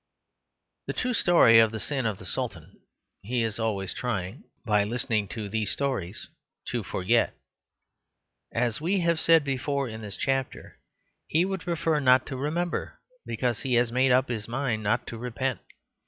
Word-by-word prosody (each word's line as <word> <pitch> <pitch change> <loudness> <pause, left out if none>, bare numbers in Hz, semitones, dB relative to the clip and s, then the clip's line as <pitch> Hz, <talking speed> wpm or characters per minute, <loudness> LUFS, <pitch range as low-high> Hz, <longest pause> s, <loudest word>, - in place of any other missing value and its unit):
The - - -2
true 250 0 -1
story 170 - +6
of 110 -1 +6
the 110 0 -5
sin 135 -1 -1
of 105 -3 -2
the 95 - -12
Sultan - - -4 0.5
he 120 +4 -1
is 110 0 -2
always 100 -4 -1
trying, 110 -2 -4 0.2
by 105 -2 +3
listening 115 -1 -1
to 105 +2 -5
these 110 +1 -2
stories, 120 -9 -3 0.4
to - - -1
forget. - - +1 1.2
As 115 +2 -1
we 185 +4 +1
have 170 -1 +2
said 165 -1 +5
before 140 0 -1
in 110 -1 -7
this 105 -1 -7
chapter, 135 -1 -2 0.5
he 165 +4 +2
would 190 -2 -3
prefer 165 -2 0
not 130 -2 +5
to 135 - -5
remember, 160 +6 -2 0.3
because 120 -3 -1
he 130 -3 0
has 120 -1 +3
made 130 +2 +3
up 130 +1 +4
his 110 -3 -4
mind 120 -2 -1
not 110 +2 0
to 115 - -7
repent. 125 +1 -2
125 Hz, 165 wpm, -27 LUFS, 110-140 Hz, 1.2 s, story